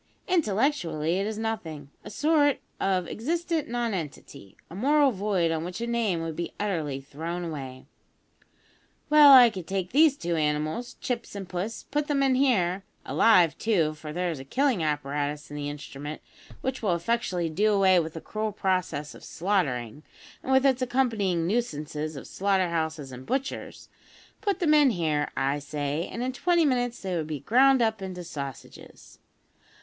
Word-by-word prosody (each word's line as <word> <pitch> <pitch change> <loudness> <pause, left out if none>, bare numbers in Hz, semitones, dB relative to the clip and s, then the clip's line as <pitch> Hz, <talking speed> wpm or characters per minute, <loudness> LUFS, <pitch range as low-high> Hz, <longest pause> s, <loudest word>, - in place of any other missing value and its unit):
Intellectually 200 - +1
it 200 - -1
is 215 -1 -4
nothing 165 -11 -4
a - - -8
sort 290 +4 +2 0.2
of 185 -3 0
existent 330 +5 -2
nonentity, 175 - -5
a - - -13
moral 280 +7 +3
void 195 -5 0
on 160 0 -1
which 180 +4 -6
a 235 - -2
name 225 -8 0
would 165 -1 -4
be 170 - -5
utterly 160 -10 -2
thrown 165 +6 -5
away. 135 -5 -7 1.3
Well, 300 -2 +9
I 250 -3 +9
could 185 -5 -7
take 190 -2 -2
these 295 +1 +5
two 170 -6 -2
animals, 155 +9 -1
Chips 240 -4 -4
and 195 -2 -6
Puss, 185 +5 -4
put 295 +1 -2
them 280 -2 +1
in 270 -1 +3
here 200 -9 +2 0.2
(alive, 180 -8 +4
too, 170 -9 +1
for 155 0 -9
there 175 +2 -1
is 155 - -6
a - - -7
killing 255 - +1
apparatus 145 -1 -2
in - - -6
the 145 0 -3
instrument 145 +1 -7 0.4
which 260 0 -3
will 195 -6 +1
effectually 180 -2 -1
do 210 +7 +2
away 190 -3 +5
with 160 -1 -4
the 160 - -6
cruel 215 0 -3
process 185 -7 -1
of - - -14
slaughtering, 150 - -1 0.4
and 265 - -4
with 265 +1 +4
its 265 -2 +3
accompanying 225 -9 +1
nuisances 155 -7 -2
of 135 - -8
slaughter 190 -2 0
houses 160 -4 -3
and 125 +1 -10
butchers) 265 +1 -4 0.5
put 405 -2 0
them 320 -5 +3
in 295 -3 +6
here, 155 -8 0
I 135 +2 0
say, 145 +2 -3
and 235 - -4
in 255 +1 -2
twenty 345 +3 +2
minutes 245 -3 0
they 185 -2 -2
would 160 -3 -2
be 150 -4 -5
ground 260 +2 +4
up 220 -2 0
into 185 -2 -6
sausages. 140 -6 -9
185 Hz, 170 wpm, -27 LUFS, 155-240 Hz, 1.3 s, Well